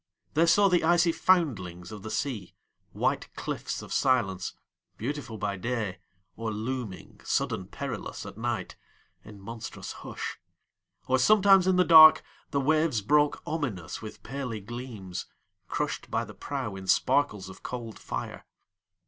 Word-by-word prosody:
They 165 +2 +4
saw 200 +4 +6
the 180 -3 +3
icy 170 +1 +4
foundlings 120 - +1
of 105 -2 -8
the 110 - -7
sea, 115 -7 -3 0.4
White - - -1
cliffs - - -4
of - - -7
silence, 100 -9 +1 0.4
beautiful 135 -2 -4
by 100 -1 -2
day, 110 -3 -2 0.4
Or 115 0 -3
looming, 110 -2 -5
sudden - - -1
perilous, - - -5
at - - -8
nightIn 110 -2 -7
monstrous 110 +3 -7
hush; - - -6 0.7
or 130 0 +2
sometimes 195 +2 +6
in 185 - +4
the 180 0 +4
darkThe 155 -3 +6
waves 155 -6 +2
broke 145 +5 +3
ominous 130 - -3
with 110 -1 -9
paly 130 -5 -4
gleamsCrushed 115 -6 -6
by - - 0
the - - -11
prow 130 -8 -4
in 95 -1 -8
sparkles 105 -5 +2
of 95 - -11
cold 120 -3 -6
fire. - - -6
125 Hz, 130 wpm, -28 LUFS, 105-155 Hz, 0.7 s, saw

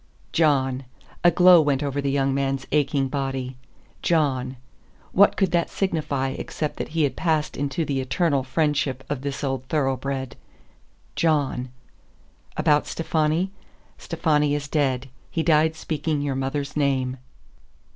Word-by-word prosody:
John. 135 -4 +2 0.4
A 175 - +8
glow 180 0 +7
went 145 -2 +1
over 140 0 -1
the 140 - -1
young 135 -1 +1
man's 135 0 -1
aching 140 -2 +2
body. 135 -2 -3 0.5
John. 135 -6 +1 0.5
What 200 +2 +5
could 190 -4 +2
that 170 -1 +1
signify 150 -8 -1
except 150 +3 -4
that - - -3
he 160 - +4
had 135 -3 0
passed 155 -3 0
into 145 +4 -1
the 135 -2 -1
eternal 140 +2 +1
friendship 135 -1 0
of 140 -3 -2
this 140 0 -4
old 135 -2 -1
thoroughbred? 135 -2 -1 0.8
John. 145 -6 +1 0.9
"About 150 -2 +3
Stefani?" 165 +3 0 0.5
"Stefani 150 -2 +1
is 145 0 -3
dead. 135 -3 0 0.2
He 165 - -1
died 160 0 +3
speaking 155 -1 -2
your 140 -1 -1
mother's 135 +1 -3
name." 135 -3 0
145 Hz, 135 wpm, -24 LUFS, 135-155 Hz, 0.9 s, A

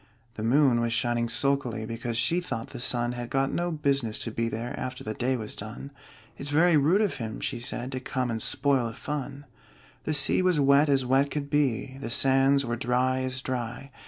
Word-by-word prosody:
The 110 - -7
moon 125 +1 +3
was 115 -1 0
shining 120 +1 0
sulkily, 135 -6 0
Because 115 +1 -4
she 145 +10 +2
thought 115 -10 -5
the 125 - -8
sun 120 -1 0
Had 120 -1 -6
got 135 0 0
no 175 0 -1
business 140 -8 0
to 115 - -4
be 115 +1 -1
there 115 +2 -4
After 125 -1 -5
the 110 - -4
day 130 +3 -1
was 110 -2 -6
done 110 +7 -8 0.5
"It's 140 - -3
very 165 +3 +4
rude 155 +8 +4
of 205 -8 0
him," 110 -3 -5
she - - -3
said, 125 +1 -4
"To 130 - -3
come 125 -1 -2
and 110 -1 -3
spoil 135 -3 +1
the 115 - -6
fun!" 145 0 -5 0.6
The 155 - 0
sea 145 +5 +4
was 180 -4 +2
wet 140 +2 +4
as 135 -2 +2
wet 135 +3 +2
could 140 -1 -4
be, 135 -2 0
The 115 - -4
sands 135 +2 +3
were 120 0 -2
dry 125 +2 +1
as 130 0 -3
dry. 130 +2 -4
130 Hz, 210 wpm, -27 LUFS, 120-140 Hz, 0.6 s, very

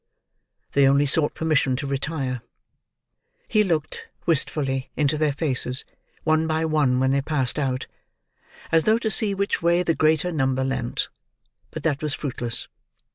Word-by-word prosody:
They 140 -1 +4
only 140 +1 +4
sought 145 +1 +1
permission 155 -5 +1
to 140 - -4
retire. 135 -2 -2 1.1
He 215 - +3
looked, 160 -6 -2 0.2
wistfully, 135 -4 0
into 150 0 +2
their 155 -1 +1
faces, 135 -3 0 0.4
one 155 0 +2
by 160 0 0
one 145 -5 +2
when 130 0 +2
they 140 0 +2
passed 140 -2 0
out, 130 -3 -1 0.9
as 165 -1 +3
though 220 +1 +4
to 225 -2 -2
see 200 +1 +2
which 200 +1 -1
way 170 +1 +3
the 170 - +2
greater 160 +2 +2
number 130 -4 0
leant; 130 -2 -2 0.6
but - - -7
that 150 -2 0
was 150 -2 -1
fruitless. 120 -5 -3
150 Hz, 150 wpm, -24 LUFS, 135-160 Hz, 1.1 s, They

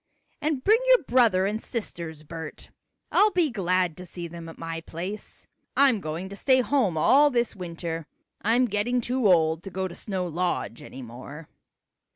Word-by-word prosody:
"And 295 -4 -1
bring 435 +3 +5
your - - +6
brother 235 -8 +3
and 215 +3 -1
sisters, 170 - -4
Bert. 160 0 -8 0.4
I'll 425 - +5
be 350 -7 +1
glad 185 -5 +1
to 180 - -8
see 175 0 -6
them 165 0 -9
at 165 - -11
my 165 0 -5
place. 180 +6 -7 0.3
I'm 265 -7 +5
going 160 +4 -4
to 200 - -8
stay 260 +5 +3
home 245 - +1
all 285 - +6
this 240 -4 0
winter. 170 -3 -5 0.3
I'm 235 +5 +3
getting 230 +3 0
too 245 -1 +1
old 160 -3 +4
to 195 - -7
go 190 0 -2
to 175 - -10
Snow 190 -1 -3
Lodge 175 -7 -2
anymore." 130 +5 -10
185 Hz, 170 wpm, -26 LUFS, 165-245 Hz, 0.4 s, your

